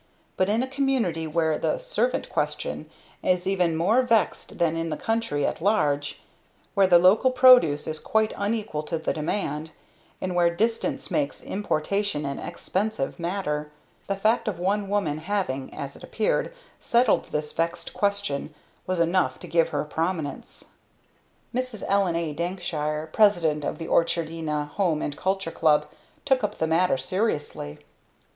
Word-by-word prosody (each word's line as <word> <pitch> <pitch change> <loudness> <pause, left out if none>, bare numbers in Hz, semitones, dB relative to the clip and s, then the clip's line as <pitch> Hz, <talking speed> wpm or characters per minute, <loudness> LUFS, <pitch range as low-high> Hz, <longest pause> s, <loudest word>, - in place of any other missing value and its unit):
But 185 +1 +1
in 225 +4 +2
a - - -3
community 260 - 0
where 160 0 +1
the - - 0
"servant - - -1
question" - - -3 0.3
is 180 0 +1
even 180 -4 +1
more 200 +10 +3
vexed 230 -3 0
than 165 -1 +2
in 165 0 -2
the 155 - -3
country 225 -11 -1
at - - -2
large, 145 -8 +1 0.5
where 195 -1 +4
the 175 -2 +7
local 190 +8 +5
product 250 - +6
is 155 0 -2
quite 220 +4 +1
unequal 205 -6 -2
to 165 +2 -3
the 160 - -1
demand, 155 -1 -2 0.5
and 185 -1 -3
where 175 -1 +4
distance 225 +4 -1
makes 290 -2 -1
importation 195 -3 -1
an 140 0 -3
expensive 185 -3 -3
matter, 170 -4 -2 0.4
the 195 - 0
fact 220 +5 +1
of 205 -5 -1
one 195 +3 0
woman's 195 -7 0
having, 180 -10 -2
as 140 0 -6
it - - -14
appeared, 220 - 0 0.3
settled 235 -2 +3
this 150 0 -3
vexed 170 +1 -2
question, 200 -8 -1 0.3
was 185 -1 -1
enough 170 +2 +2
to - - -10
give 165 -1 +2
her 145 - -1
prominence. 160 -2 -4 0.9
Mrs. 255 -3 -3
Ellen 195 -4 +2
A. 165 -3 -1
Dankshire, 155 -2 -3
President 170 -8 +3
of - - -2
the 165 - -6
Orchardina 160 -3 0
Home 165 -1 0
and 145 - -3
Culture 190 0 -1
Club, 155 -3 +3 0.4
took 265 -4 +2
up 210 0 -2
the 160 - +1
matter 165 -1 +2
seriously. 145 - -2
175 Hz, 150 wpm, -25 LUFS, 155-205 Hz, 0.9 s, the